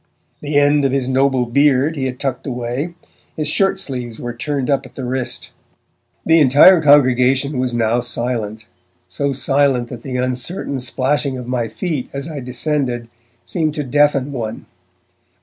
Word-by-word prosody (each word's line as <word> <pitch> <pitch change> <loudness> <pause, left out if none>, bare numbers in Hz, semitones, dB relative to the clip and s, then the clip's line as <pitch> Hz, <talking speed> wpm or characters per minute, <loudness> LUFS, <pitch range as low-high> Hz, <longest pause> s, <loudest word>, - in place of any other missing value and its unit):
The 145 0 -1
end 145 0 +4
of 135 - +2
his 135 -2 0
noble 130 -1 +2
beard 140 +4 +2
he 135 -3 -2
had 125 -1 -4
tucked 135 +1 -3
away; 125 +6 -3 0.4
his 155 -1 -1
shirt 195 +6 +2
sleeves 125 -9 -5
were 120 -1 -5
turned 140 +2 -3
up 140 -2 +1
at 130 - -15
the 135 - -6
wrist. 125 -1 -3 0.7
The 165 0 +5
entire 150 +6 +7
congregation 135 -1 +4
was 130 -1 0
now 115 +1 +1
silent, 115 -3 -3 0.4
so 140 +10 -2
silent 135 -2 +1
that 120 -3 -8
the 130 0 -4
uncertain 130 +3 -3
splashing 135 +2 -1
of 125 -1 -7
my 125 -2 -1
feet 145 - -4
as 140 +2 -5
I 155 -3 -6
descended 125 -2 -2 0.4
seemed 155 -3 -1
to 150 - -2
deafen 145 0 +2
one. 115 -4 -5
130 Hz, 160 wpm, -18 LUFS, 125-145 Hz, 0.7 s, entire